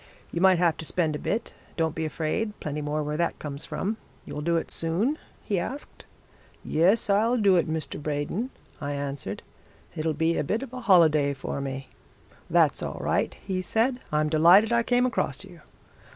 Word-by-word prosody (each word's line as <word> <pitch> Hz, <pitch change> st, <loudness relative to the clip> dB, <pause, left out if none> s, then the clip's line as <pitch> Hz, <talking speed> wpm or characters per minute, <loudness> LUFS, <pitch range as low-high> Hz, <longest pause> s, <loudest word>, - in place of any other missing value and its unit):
'You 170 Hz, -, -2 dB
might 190 Hz, -1 st, +6 dB
have 170 Hz, -2 st, +2 dB
to -, -, -6 dB
spend 160 Hz, -2 st, +1 dB
a -, -, -4 dB
bit. 220 Hz, -, -2 dB, 0.2 s
Don't 160 Hz, -2 st, +1 dB
be 160 Hz, 0 st, -2 dB
afraid 165 Hz, +8 st, -2 dB
plenty 150 Hz, 0 st, -4 dB
more 150 Hz, +1 st, -1 dB
where 150 Hz, +1 st, -3 dB
that 170 Hz, -, 0 dB
comes 140 Hz, -1 st, -6 dB
from. 215 Hz, +3 st, -3 dB, 0.3 s
You'll 150 Hz, -, -5 dB
do 170 Hz, +2 st, +1 dB
it 165 Hz, -, -3 dB
soon?' 195 Hz, -, 0 dB, 0.2 s
he 200 Hz, -4 st, 0 dB
asked. 275 Hz, +11 st, -6 dB, 0.6 s
'Yes, 185 Hz, +8 st, +3 dB
I'll 220 Hz, +5 st, +3 dB
do 200 Hz, -4 st, +4 dB
it, 170 Hz, -3 st, +2 dB
Mr. 155 Hz, -2 st, -3 dB
Braden,' 150 Hz, -, -2 dB, 0.3 s
I 145 Hz, 0 st, -2 dB
answered. 140 Hz, -8 st, -4 dB, 0.5 s
'It'll 155 Hz, -1 st, -1 dB
be 160 Hz, +2 st, +1 dB
a -, -, +1 dB
bit 215 Hz, -, -1 dB
of 260 Hz, -2 st, -9 dB
a 255 Hz, -, -5 dB
holiday 155 Hz, -9 st, +4 dB
for 135 Hz, +1 st, -4 dB
me.' 135 Hz, -1 st, -5 dB, 0.6 s
'That's -, -, +3 dB
all -, -, -4 dB
right,' -, -, 0 dB
he 185 Hz, -2 st, -1 dB
said. 235 Hz, +7 st, +1 dB
'I'm 150 Hz, 0 st, +1 dB
delighted 175 Hz, +9 st, +6 dB
I 235 Hz, -, +4 dB
came 245 Hz, +1 st, +2 dB
across 170 Hz, -, -1 dB
you.' 180 Hz, -4 st, -14 dB
165 Hz, 185 wpm, -26 LUFS, 150-205 Hz, 0.6 s, might